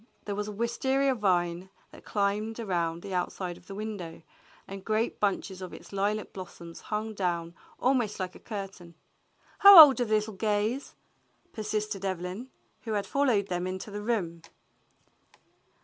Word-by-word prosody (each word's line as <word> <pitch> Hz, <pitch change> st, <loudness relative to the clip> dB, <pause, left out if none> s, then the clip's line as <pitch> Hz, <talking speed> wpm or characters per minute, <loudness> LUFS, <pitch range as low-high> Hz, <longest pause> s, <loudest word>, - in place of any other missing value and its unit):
There 205 Hz, -, -3 dB
was 205 Hz, +1 st, -3 dB
a -, -, -4 dB
wistaria 265 Hz, +5 st, +1 dB
vine 180 Hz, -4 st, 0 dB, 0.2 s
that -, -, -14 dB
climbed 210 Hz, +2 st, -1 dB
around 170 Hz, -6 st, -2 dB
the 195 Hz, -, -6 dB
outside 180 Hz, 0 st, -2 dB
of 175 Hz, -, -18 dB
the 195 Hz, -, -8 dB
window, 200 Hz, -7 st, -6 dB, 0.4 s
and 195 Hz, 0 st, -8 dB
great 220 Hz, +2 st, -1 dB
bunches 195 Hz, -2 st, -1 dB
of 185 Hz, -, -7 dB
its -, -, -12 dB
lilac 205 Hz, +2 st, -1 dB
blossoms 170 Hz, -3 st, -9 dB
hung 215 Hz, +1 st, -3 dB
down 175 Hz, -4 st, -2 dB, 0.3 s
almost 245 Hz, -6 st, +1 dB
like 185 Hz, -1 st, -3 dB
a -, -, -13 dB
curtain. 195 Hz, -5 st, -8 dB, 0.6 s
"How 400 Hz, -3 st, +11 dB
old 275 Hz, -5 st, +10 dB
are -, -, +2 dB
the 215 Hz, -1 st, +2 dB
little 215 Hz, 0 st, -1 dB
Gays. 215 Hz, +6 st, -1 dB, 0.6 s
f^" -, -, -39 dB
persisted 215 Hz, -2 st, -3 dB
Evelyn, 185 Hz, +5 st, -4 dB, 0.3 s
who 225 Hz, -3 st, -4 dB
had 205 Hz, -1 st, -1 dB
followed 225 Hz, -4 st, +1 dB
them 180 Hz, 0 st, -2 dB
into 185 Hz, +3 st, -5 dB
the 205 Hz, +1 st, -5 dB
room. 190 Hz, -7 st, -2 dB
205 Hz, 160 wpm, -28 LUFS, 185-220 Hz, 0.6 s, How